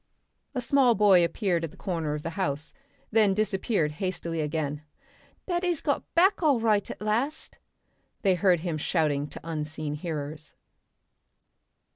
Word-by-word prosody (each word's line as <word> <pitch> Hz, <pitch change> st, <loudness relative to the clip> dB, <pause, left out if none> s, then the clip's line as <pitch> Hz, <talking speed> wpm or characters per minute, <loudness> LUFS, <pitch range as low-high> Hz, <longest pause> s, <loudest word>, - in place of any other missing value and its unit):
A 250 Hz, -, 0 dB
small 255 Hz, -1 st, +4 dB
boy 195 Hz, -4 st, +6 dB
appeared 170 Hz, 0 st, 0 dB
at 165 Hz, -, -2 dB
the 185 Hz, -, -17 dB
corner 165 Hz, -5 st, -2 dB
of 150 Hz, -, -6 dB
the 165 Hz, -, -3 dB
house, 155 Hz, -3 st, -3 dB
and 275 Hz, -4 st, -8 dB
then 210 Hz, -3 st, +5 dB
disappeared 195 Hz, -5 st, 0 dB
hastily 170 Hz, -3 st, -2 dB
again. 150 Hz, -1 st, -2 dB, 0.6 s
"Daddy's 350 Hz, -3 st, 0 dB
got 285 Hz, -, -2 dB
back 370 Hz, +4 st, +4 dB
all 290 Hz, -7 st, +4 dB
right 215 Hz, -3 st, +2 dB
at -, -, -7 dB
last," 240 Hz, +9 st, -1 dB, 0.6 s
they 195 Hz, -3 st, +4 dB
heard 180 Hz, -2 st, +3 dB
him 165 Hz, -3 st, -2 dB
shouting 150 Hz, -3 st, 0 dB
to -, -, -9 dB
unseen 155 Hz, -2 st, -4 dB
hearers. 150 Hz, -1 st, -5 dB
180 Hz, 145 wpm, -27 LUFS, 155-225 Hz, 0.6 s, boy